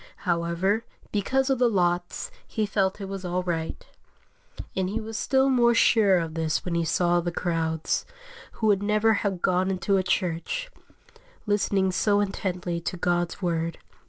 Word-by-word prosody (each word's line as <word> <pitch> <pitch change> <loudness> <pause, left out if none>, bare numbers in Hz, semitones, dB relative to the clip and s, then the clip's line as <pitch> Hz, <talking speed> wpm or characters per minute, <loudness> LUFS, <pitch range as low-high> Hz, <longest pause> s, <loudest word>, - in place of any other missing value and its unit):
However, 175 +5 +1 0.3
because 265 +7 +1
of 265 - +1
the 245 -1 +4
lots, 175 -3 0 0.2
he 215 - -1
felt 195 -1 0
it 195 - -5
was 195 -1 -6
all 180 0 -1
right; 165 -3 -3 0.9
and 185 -1 0
he 215 +3 -2
was 225 0 -7
still 265 +4 +2
more 240 -3 +4
sure 210 -4 +5
of 165 -2 -2
this 160 +3 -1
when 175 - -2
he 170 0 +1
saw 175 +1 +2
the 175 0 -2
crowds, 165 -2 -1 0.5
who 220 - -3
would 205 -2 +3
never 215 +2 +3
have 195 -4 -2
gone 185 +1 +2
into 195 +1 +1
a - - +3
church, 185 - -1 0.7
listening 200 -2 +1
so 205 +2 +2
intently 180 -3 -2
to 180 - -4
God's 175 +2 -1
Word. 165 -1 -1
190 Hz, 160 wpm, -26 LUFS, 175-210 Hz, 0.9 s, sure